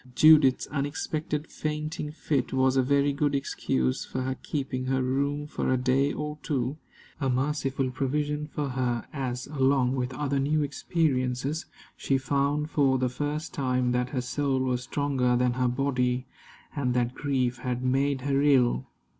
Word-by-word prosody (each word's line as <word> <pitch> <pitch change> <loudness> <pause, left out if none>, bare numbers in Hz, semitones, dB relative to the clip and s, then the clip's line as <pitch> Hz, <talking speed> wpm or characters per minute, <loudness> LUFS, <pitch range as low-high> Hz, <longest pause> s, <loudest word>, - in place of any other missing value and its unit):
Judith's 155 -4 +6
unexpected 150 +1 -2
fainting 150 0 -4
fit 145 -4 -1
was 130 0 +3
a 135 - +5
very 140 +2 +2
good 145 0 +1
excuse 65 - -1
for 130 - -4
her 130 +1 -1
keeping 130 -1 -4
her 130 0 +1
room 140 +3 0
for 150 - -2
a 130 - +3
day 130 +3 +2
or 150 0 -4
two 135 -1 -1 0.4
a 135 -3 0
merciful 135 0 0
provision 150 +3 -1
for 145 -1 -3
her, 125 -2 -1
as, 125 -3 -3
along 135 -3 +2
with 125 -1 -2
other 140 -2 0
new 150 +2 +1
experiences, 140 -1 -1 0.3
she 135 - +1
found 140 +3 0
for 135 -3 +3
the 125 0 +1
first 145 +4 -3
time 125 -2 0
that 125 0 0
her 130 -2 -2
soul 135 +1 0
was 125 -1 0
stronger 130 -2 0
than 125 0 +2
her 125 0 +1
body, 125 -1 0 0.5
and 125 -4 0
that 125 0 +1
grief 130 -3 -1
had 125 0 -3
made 135 +1 +1
her 140 +1 +1
ill. 130 - +3
135 Hz, 160 wpm, -27 LUFS, 125-145 Hz, 0.5 s, Judith's